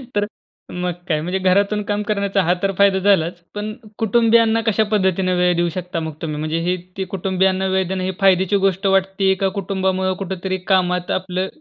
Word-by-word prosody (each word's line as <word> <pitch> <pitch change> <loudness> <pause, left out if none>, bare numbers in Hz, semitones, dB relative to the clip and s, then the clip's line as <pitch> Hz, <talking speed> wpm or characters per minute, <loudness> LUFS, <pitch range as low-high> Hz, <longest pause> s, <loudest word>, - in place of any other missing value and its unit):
तर 205 0 +2 0.5
मग 180 0 -2 0.2
काय? 155 -3 0
म्हणजे 180 +4 -2
घरातून 200 +3 +2
काम 205 0 -1
करण्याचा 200 -1 0
हा 175 +2 +3
तर 195 - +2
फायदा 200 -1 +4
झालाच. 180 -3 +2 0.2
पण 210 +1 -4 0.2
कुटुंबियांना 225 +1 +3
कशा 220 0 +3
पद्धतीने 190 -2 +1
वेळ 180 0 +2
देऊ 175 0 +1
शकता 180 -2 -4
मग 160 -1 -4
तुम्ही? 155 -2 -3
म्हणजे 155 +2 -2
हि 180 - +2 0.2
ते 190 - -1
कुटुंबियांना 190 0 +1
वेळ 190 -2 +1
देणं 185 0 -3
हे 190 - -1
फायद्याची 190 +1 +4
गोष्ट 195 +1 0
वाटते 195 0 +2
का, 195 0 0
कुटुंबामुळ 190 -1 -1
कुठेतरी 190 0 -3 0.2
कामात 180 -1 +1
आपलं 185 0 -2
190 Hz, 180 wpm, -20 LUFS, 180-200 Hz, 0.5 s, फायदा